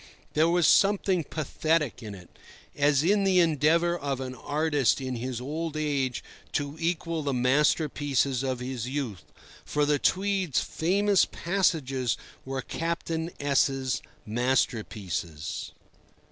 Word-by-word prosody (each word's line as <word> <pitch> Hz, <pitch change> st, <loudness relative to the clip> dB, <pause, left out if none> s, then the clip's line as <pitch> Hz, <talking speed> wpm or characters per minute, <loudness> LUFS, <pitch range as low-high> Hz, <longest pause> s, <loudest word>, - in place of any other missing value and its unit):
There 160 Hz, +2 st, +3 dB
was 175 Hz, -1 st, +3 dB
something 195 Hz, -2 st, +4 dB
pathetic 155 Hz, -1 st, -1 dB
in 105 Hz, -3 st, -7 dB
it, 90 Hz, -2 st, -16 dB, 0.4 s
as 145 Hz, 0 st, +3 dB
in 200 Hz, +4 st, +3 dB
the 190 Hz, -2 st, +4 dB
endeavour 165 Hz, +1 st, +3 dB
of 140 Hz, -5 st, -3 dB
an 130 Hz, -1 st, -5 dB
artist 145 Hz, 0 st, +1 dB
in 130 Hz, -2 st, -3 dB
his 125 Hz, 0 st, -4 dB
old 155 Hz, +4 st, -4 dB
age 140 Hz, -5 st, -1 dB, 0.3 s
to 145 Hz, 0 st, -2 dB
equal 165 Hz, -1 st, -1 dB
the 140 Hz, -3 st, -1 dB
masterpieces 140 Hz, 0 st, +2 dB
of 130 Hz, -2 st, -2 dB
his 125 Hz, -1 st, -4 dB
youth—for 140 Hz, +3 st, -4 dB
the 145 Hz, -1 st, +2 dB
Tweed's 190 Hz, -5 st, +1 dB
famous 195 Hz, +4 st, +2 dB
passages 145 Hz, -, 0 dB, 0.3 s
were 135 Hz, -1 st, -3 dB
Captain 165 Hz, 0 st, -3 dB
S—'s 135 Hz, -3 st, +1 dB, 0.2 s
masterpieces. 105 Hz, -, -2 dB
145 Hz, 120 wpm, -27 LUFS, 130-165 Hz, 0.4 s, something